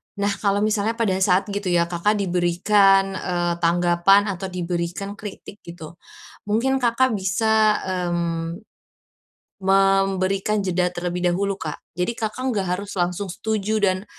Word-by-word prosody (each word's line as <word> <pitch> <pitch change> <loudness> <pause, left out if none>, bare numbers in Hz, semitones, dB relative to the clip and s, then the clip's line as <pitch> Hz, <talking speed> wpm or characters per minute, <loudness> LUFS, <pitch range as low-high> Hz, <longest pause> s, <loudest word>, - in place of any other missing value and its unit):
Nah, 200 0 0
kalau 200 0 +1
misalnya 215 +1 0
pada 225 -5 0
saat 185 0 +3
gitu 200 -1 -3
ya, 175 -1 +3
Kakak 190 +5 +1
diberikan, 195 +1 +3
eee, 175 -2 -1
tanggapan 175 +4 +3
atau 190 +1 -5
diberikan 175 +2 -4
kritik 205 0 -9
gitu, 170 -1 -11 0.5
mungkin 260 +6 +1
Kakak 250 +1 +2
bisa, 215 +2 +2
mmm, 175 0 -3 0.9
memberikan 195 +1 +1
jeda 180 -1 0
terlebih 180 0 -3
dahulu, 195 +2 -1
Kak. 155 -5 -6 0.2
Jadi, 180 +6 -1
Kakak 230 +2 -4
enggak 195 -4 -2
harus 200 +1 -7
langsung 180 +1 -2
setuju 215 +1 -2
dan 190 -1 +1
195 Hz, 130 wpm, -22 LUFS, 175-205 Hz, 0.9 s, saat